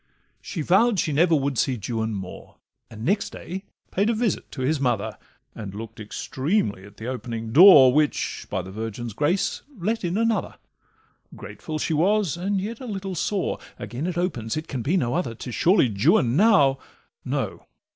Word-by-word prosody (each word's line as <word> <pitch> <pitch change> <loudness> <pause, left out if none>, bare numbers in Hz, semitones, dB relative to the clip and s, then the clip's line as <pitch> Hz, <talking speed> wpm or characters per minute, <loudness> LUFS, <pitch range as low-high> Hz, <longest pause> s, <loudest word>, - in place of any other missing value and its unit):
She 170 - -5
vow'd 200 +5 +3
she 155 - 0
never 165 +3 +4
would 140 -3 0
see 130 -2 +1
Juan 110 0 -3
more, 95 -2 -8 0.3
And 110 +1 -8
next 200 +4 +1
day 190 +3 -7 0.3
paid 200 +4 +1
a 230 - +1
visit 220 -5 -1
to 130 - -5
his 150 +3 +1
mother, 110 -5 -1 0.4
And 100 -4 -7
look'd 115 +1 -8
extremely 120 - -2
at 100 0 -16
the 110 - -8
opening 120 -3 -5
door, 145 - +9
Which, 150 0 0
by 95 - -2
the 95 - -9
Virgin's 110 +2 -5
grace, 160 - 0 0.2
let 215 +5 -2
in 175 +2 -1
another; 230 0 0 0.8
Grateful 155 -1 -7
she 155 - -1
was, 190 +2 +2
and 195 +3 -1
yet 220 +4 -5
a 255 - -8
little 195 -3 -4
sore— 190 +3 -1 0.2
Again 130 +8 -5
it 175 -2 -3
opens, 125 -10 -2
it 155 +1 -4
can 130 - -4
be 160 +11 +1
no 120 -7 0
other, 150 -9 -2
'Tis 120 +2 -7
surely 175 - +4
Juan 130 - +3
now—No! 135 - 0
150 Hz, 175 wpm, -24 LUFS, 115-190 Hz, 0.8 s, door